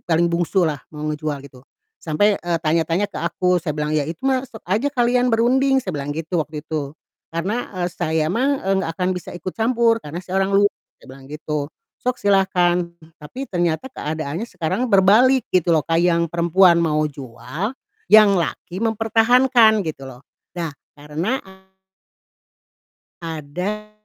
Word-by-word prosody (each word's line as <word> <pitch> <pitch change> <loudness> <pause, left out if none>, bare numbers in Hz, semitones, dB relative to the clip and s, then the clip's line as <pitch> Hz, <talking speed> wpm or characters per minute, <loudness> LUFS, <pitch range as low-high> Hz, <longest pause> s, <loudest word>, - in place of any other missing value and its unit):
paling 170 +1 +2
bungsu 175 +2 +1
lah 150 -4 -2
mau 150 0 -7
ngejual 150 -2 -4
gitu, 130 -2 -17 0.4
sampai, 200 +6 +2
eee, 175 -1 -2
tanya-tanya 165 +5 +1
ke - - -6
aku 180 +2 +1
saya 150 - -2
bilang, 150 0 -2
"Ya 150 -2 +1
itu 165 0 -6
mah 260 -1 +2
sok 220 -3 -13
aja 220 +10 +1
kalian 245 -2 +2
berunding," 265 +4 +3
saya 185 -6 -5
bilang 140 0 -4
gitu 160 +2 -2
waktu 150 +1 -8
itu, 150 -3 -3 0.4
"karena, 195 +9 -3
eee, 175 - 0
saya 160 -3 0
mah, 265 +9 +1
eee, 195 - +2
enggak 165 - -2
akan 180 0 +1
bisa 180 - -7
ikut 180 +2 -6
campur 230 0 +2
karena 150 +3 -6
saya 185 +2 -1
orang 195 - -1
luar," 205 0 +4 0.3
saya - - -19
bilang 135 +1 -13
gitu. 150 -1 -4 0.3
Sok 250 0 -1
silakan 180 -3 +1 0.2
tapi 255 - -7
ternyata 175 +2 -1
keadaannya 160 - -4
sekarang 180 +8 -2
berbalik 220 +7 +5
gitu 180 -2 +3
loh, 155 -3 +2
Kak, 165 0 +2
yang 170 -1 +2
perempuan 170 +1 +4
mau 155 -2 +1
jual, 135 - -6 0.4
yang 215 -2 +7
laki 180 +2 -3
mempertahankan 225 -1 +3
gitu 155 -3 -5
loh, 125 +1 -15 0.3
nah 165 -4 -3 0.2
karena 160 - -2 1.8
ada 175 +7 -5
175 Hz, 160 wpm, -21 LUFS, 155-215 Hz, 1.8 s, yang